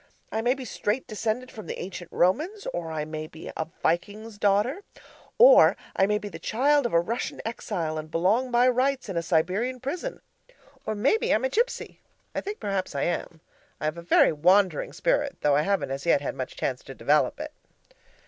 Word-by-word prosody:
I 220 Hz, -, -1 dB
may 245 Hz, +3 st, +2 dB
be 265 Hz, -2 st, -7 dB
straight 220 Hz, +2 st, -2 dB
descended 225 Hz, +3 st, -3 dB
from 215 Hz, -, -10 dB
the -, -, -5 dB
ancient 180 Hz, -1 st, -7 dB
Romans, 315 Hz, -, +1 dB
or 165 Hz, -2 st, -4 dB
I 155 Hz, -1 st, -3 dB
may 155 Hz, 0 st, -5 dB
be 160 Hz, +1 st, -9 dB
a 160 Hz, -, -3 dB, 0.2 s
Viking's 205 Hz, +6 st, -1 dB
daughter, 210 Hz, -, +2 dB, 0.6 s
or -, -, +8 dB, 0.2 s
I 195 Hz, -, +3 dB
may 210 Hz, 0 st, +2 dB
be 210 Hz, -, -6 dB
the -, -, -8 dB
child 280 Hz, +3 st, +2 dB
of -, -, -9 dB
a 170 Hz, -, +6 dB
Russian 225 Hz, +8 st, -3 dB
exile 175 Hz, -8 st, -3 dB
and 155 Hz, 0 st, -8 dB
belong 200 Hz, +11 st, +1 dB
by 245 Hz, +1 st, +4 dB
rights 255 Hz, -1 st, +1 dB
in 190 Hz, -, -4 dB
a 170 Hz, -, +1 dB
Siberian 185 Hz, +10 st, 0 dB
prison, 340 Hz, -, -4 dB, 0.7 s
or 215 Hz, -, -1 dB
maybe 275 Hz, -, +2 dB
I'm 225 Hz, +5 st, +2 dB
a -, -, +1 dB
Gipsy 475 Hz, -, -1 dB, 0.3 s
I -, -, -2 dB
think 410 Hz, +2 st, -6 dB
perhaps 195 Hz, -6 st, -2 dB
I 140 Hz, -, 0 dB
am. 170 Hz, -2 st, -3 dB, 0.4 s
I -, -, -4 dB
have 155 Hz, +2 st, -1 dB
a -, -, -7 dB
very 170 Hz, -, +4 dB
WANDERING 190 Hz, -, +3 dB
spirit, 290 Hz, -, 0 dB
though 145 Hz, -1 st, +3 dB
I 145 Hz, -, +4 dB
haven't 195 Hz, -3 st, 0 dB
as 140 Hz, +4 st, -4 dB
yet 165 Hz, -, +5 dB
had 140 Hz, -, -4 dB
much -, -, -6 dB
chance -, -, -2 dB
to -, -, -9 dB
develop -, -, +2 dB
it. -, -, -5 dB
210 Hz, 200 wpm, -26 LUFS, 170-255 Hz, 0.7 s, or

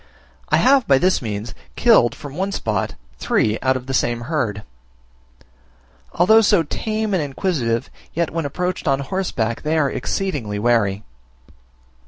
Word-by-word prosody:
I -, -, +4 dB
have 265 Hz, -1 st, +4 dB
by 135 Hz, -, +5 dB
this 185 Hz, +6 st, +2 dB
means, 110 Hz, -1 st, -5 dB, 0.2 s
killed 120 Hz, -1 st, +4 dB
from 145 Hz, -1 st, -9 dB
one 195 Hz, +3 st, -2 dB
spot, 110 Hz, -, -2 dB, 0.2 s
three 110 Hz, +1 st, +1 dB
out 130 Hz, 0 st, +2 dB
of 125 Hz, -, -9 dB
the 135 Hz, -, -4 dB
same 120 Hz, -2 st, 0 dB
herd. 115 Hz, -7 st, -2 dB, 1.5 s
Although 220 Hz, +6 st, +5 dB
so 205 Hz, -5 st, +3 dB
tame 215 Hz, +6 st, -3 dB
and 185 Hz, -, +2 dB
inquisitive, 135 Hz, -6 st, -2 dB, 0.2 s
yet 170 Hz, -1 st, -1 dB
when 165 Hz, -2 st, -2 dB
approached 180 Hz, +4 st, -3 dB
on 135 Hz, -1 st, +2 dB
horseback, 130 Hz, -8 st, -2 dB
they 155 Hz, +1 st, 0 dB
are 145 Hz, -3 st, +2 dB
exceedingly 140 Hz, -, -3 dB
wary. 105 Hz, -2 st, +1 dB
140 Hz, 145 wpm, -20 LUFS, 115-180 Hz, 1.5 s, by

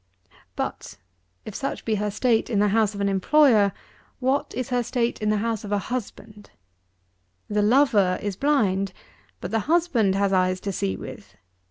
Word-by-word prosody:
88. -, -, -26 dB, 0.2 s
But, -, -, -5 dB, 0.5 s
if 215 Hz, -, -7 dB
such 275 Hz, +6 st, -4 dB
be 225 Hz, -, 0 dB
her 210 Hz, 0 st, -1 dB
state 225 Hz, +2 st, +1 dB
in 220 Hz, -, 0 dB
the 205 Hz, +1 st, +3 dB
house 215 Hz, 0 st, +1 dB
of 200 Hz, -, -4 dB
an 200 Hz, -, +1 dB
employer, 210 Hz, +1 st, +4 dB, 0.5 s
what 265 Hz, +2 st, 0 dB
is 255 Hz, -2 st, -3 dB
her 245 Hz, -1 st, +1 dB
state 240 Hz, -1 st, -2 dB
in 215 Hz, -, 0 dB
the 215 Hz, -, +2 dB
house 225 Hz, 0 st, -2 dB
of 205 Hz, -, -7 dB
a 205 Hz, -, +2 dB
husband? 210 Hz, -2 st, -6 dB, 1.0 s
The 210 Hz, 0 st, 0 dB
lover 210 Hz, -5 st, +3 dB
is 205 Hz, -2 st, -4 dB
blind; 195 Hz, -8 st, +1 dB, 0.5 s
but -, -, -5 dB
the 225 Hz, -, +1 dB
husband 295 Hz, -, +2 dB
has 200 Hz, 0 st, +1 dB
eyes 185 Hz, 0 st, +2 dB
to 200 Hz, -, -3 dB
see 95 Hz, -, -2 dB
with. -, -, -10 dB
210 Hz, 180 wpm, -24 LUFS, 200-245 Hz, 1.0 s, employer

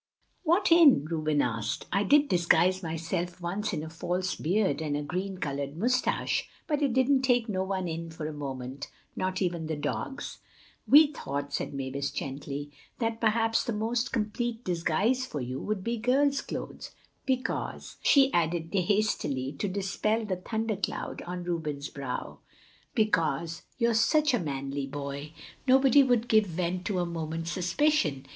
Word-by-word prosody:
"What 350 Hz, +3 st, +2 dB
in?" 310 Hz, -, +7 dB
Reuben 155 Hz, -2 st, +1 dB
asked. 115 Hz, -3 st, -2 dB
"I 195 Hz, -, +3 dB
did 290 Hz, +6 st, +5 dB
disguise 175 Hz, 0 st, +3 dB
myself 170 Hz, +2 st, -3 dB
once 195 Hz, +5 st, -2 dB
in 155 Hz, -6 st, -3 dB
a -, -, -6 dB
false 180 Hz, +3 st, -2 dB
beard 190 Hz, +1 st, +1 dB
and 150 Hz, -2 st, -1 dB
a 150 Hz, -, -3 dB
green 185 Hz, +5 st, -3 dB
colored 140 Hz, -2 st, -3 dB
mustache, 245 Hz, +7 st, +1 dB, 0.2 s
but 300 Hz, -2 st, -1 dB
it 275 Hz, -4 st, +2 dB
didn't 260 Hz, +1 st, +3 dB
take 245 Hz, -3 st, +2 dB
no 190 Hz, -3 st, -1 dB
one 190 Hz, -1 st, -2 dB
in 165 Hz, 0 st, -4 dB
for 160 Hz, -1 st, -6 dB
a 155 Hz, -, -4 dB
moment, 135 Hz, -2 st, -6 dB, 0.3 s
not 185 Hz, +1 st, -1 dB
even 170 Hz, -3 st, -2 dB
the 160 Hz, -, -2 dB
dogs." 210 Hz, -, -4 dB, 0.5 s
"We 300 Hz, +1 st, +7 dB
thought," 140 Hz, -, -4 dB
said -, -, -2 dB
Mavis 135 Hz, +1 st, -2 dB
gently, 140 Hz, +1 st, -5 dB, 0.3 s
"that 230 Hz, -1 st, -2 dB
perhaps 225 Hz, 0 st, +2 dB
the 235 Hz, -, -2 dB
most 235 Hz, +3 st, -1 dB
complete 225 Hz, +2 st, -2 dB
disguise 185 Hz, +9 st, +1 dB
for 150 Hz, -, -4 dB
you 130 Hz, +1 st, -4 dB
would 210 Hz, -3 st, -3 dB
be 235 Hz, +2 st, -1 dB
girl's 275 Hz, +5 st, +2 dB
clothes—because," 260 Hz, -1 st, -5 dB
she 275 Hz, -1 st, +5 dB
added 165 Hz, 0 st, 0 dB
hastily 185 Hz, -9 st, +1 dB
to -, -, 0 dB
dispel 205 Hz, +3 st, -1 dB
the 190 Hz, -3 st, -2 dB
thundercloud 220 Hz, +1 st, -3 dB
on 180 Hz, 0 st, -4 dB
Reuben's 155 Hz, -5 st, -3 dB
brow—"because 165 Hz, -, -3 dB, 0.2 s
you're 235 Hz, -2 st, +2 dB
such 305 Hz, +6 st, +3 dB
a 245 Hz, -, +3 dB
manly 140 Hz, -2 st, -3 dB
boy. 140 Hz, +1 st, -6 dB, 0.3 s
Nobody 265 Hz, +1 st, +6 dB
would 245 Hz, -3 st, +2 dB
give 215 Hz, -3 st, +4 dB
vent 180 Hz, +1 st, -2 dB
to 200 Hz, -, -1 dB
a 175 Hz, -, +1 dB
moment's 165 Hz, 0 st, -4 dB
suspicion. 180 Hz, -, +1 dB
185 Hz, 150 wpm, -29 LUFS, 155-230 Hz, 0.5 s, in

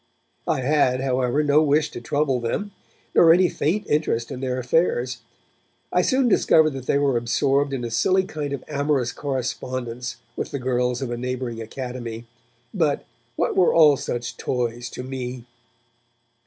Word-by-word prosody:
I -, -, +1 dB
had, 130 Hz, -2 st, +2 dB
however, 130 Hz, +2 st, +1 dB
no 145 Hz, +1 st, +4 dB
wish 150 Hz, 0 st, +2 dB
to -, -, -7 dB
trouble 140 Hz, 0 st, 0 dB
them, 200 Hz, -, -3 dB, 0.4 s
nor 165 Hz, -, +7 dB
any 180 Hz, +2 st, +5 dB
faint 190 Hz, +8 st, -1 dB
interest 150 Hz, -7 st, 0 dB
in 130 Hz, -, -5 dB
their 130 Hz, -1 st, -2 dB
affairs. 125 Hz, -1 st, 0 dB, 0.7 s
I 180 Hz, -, +4 dB
soon 260 Hz, +6 st, +2 dB
discovered 160 Hz, -7 st, +4 dB
that 135 Hz, -2 st, -7 dB
they -, -, +3 dB
were 140 Hz, -3 st, +2 dB
absorbed 135 Hz, +4 st, +1 dB
in 135 Hz, -3 st, -3 dB
a 120 Hz, -, -4 dB
silly 185 Hz, +11 st, +2 dB
kind 150 Hz, -5 st, -5 dB
of 140 Hz, -, -4 dB
amorous 140 Hz, -4 st, 0 dB
correspondence 125 Hz, -3 st, -4 dB, 0.2 s
with -, -, -4 dB
the -, -, -3 dB
girls 125 Hz, 0 st, 0 dB
of 125 Hz, -, -4 dB
a 120 Hz, -, -3 dB
neighbouring 125 Hz, -2 st, -4 dB
academy, 120 Hz, -1 st, -6 dB, 0.5 s
but -, -, 0 dB, 0.3 s
'what -, -, 0 dB
were 185 Hz, -, +4 dB
all 155 Hz, -3 st, +7 dB
such 120 Hz, -2 st, -4 dB
toys 120 Hz, -1 st, -2 dB
to 125 Hz, -, -7 dB
me?' 125 Hz, -2 st, -6 dB
130 Hz, 160 wpm, -23 LUFS, 125-150 Hz, 0.7 s, nor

